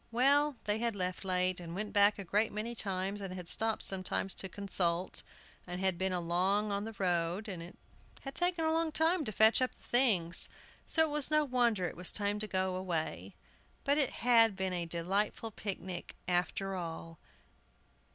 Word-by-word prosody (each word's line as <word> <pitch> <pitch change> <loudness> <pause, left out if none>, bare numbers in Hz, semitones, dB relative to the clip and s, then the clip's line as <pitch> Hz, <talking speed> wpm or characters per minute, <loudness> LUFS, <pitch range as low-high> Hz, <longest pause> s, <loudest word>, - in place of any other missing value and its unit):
Well, 280 +4 +3
they 210 +1 0
had 230 -2 -1
left 185 -1 -3
late, 185 -1 +1
and 170 -1 -8
went 210 +2 -4
back 205 0 +5
a 200 - -6
great 210 +5 +1
many 215 +3 -3
times, 195 -2 -2
had 185 -2 -6
stopped 225 +3 0
sometimes 190 0 -2
to 190 - -4
consult, 180 -3 +1 0.5
and 180 0 -5
had 190 -2 0
been 190 0 +1 0.2
long 195 +5 +1
on 200 +1 -2
the 225 -1 -7
road, 175 +2 -1
and 185 -5 -6
it 170 +2 -11 0.4
had 270 - -7
taken 350 -1 +1
a 320 - +2
long 325 0 0
time 325 +2 +2
to 215 - -3
fetch 220 +4 +5
up 255 - -1
the - - -24
things, 205 -10 +4 0.4
so 320 - +4
it 315 - -1
was 295 -2 +2
no 305 -1 +3
wonder 240 -7 +1
it - - -4
was 180 0 +2
time 205 0 -1
to 215 - -2
go 185 -2 -1
away. 175 -4 -4 0.5
But 285 +1 +2
it 275 - +5
had 230 -3 +3
been 190 -1 -2
a 175 -1 -3
delightful 195 +6 -2
picnic, 190 -4 -6
after 185 +2 -1
all. 165 -2 -7
200 Hz, 185 wpm, -32 LUFS, 180-230 Hz, 0.5 s, back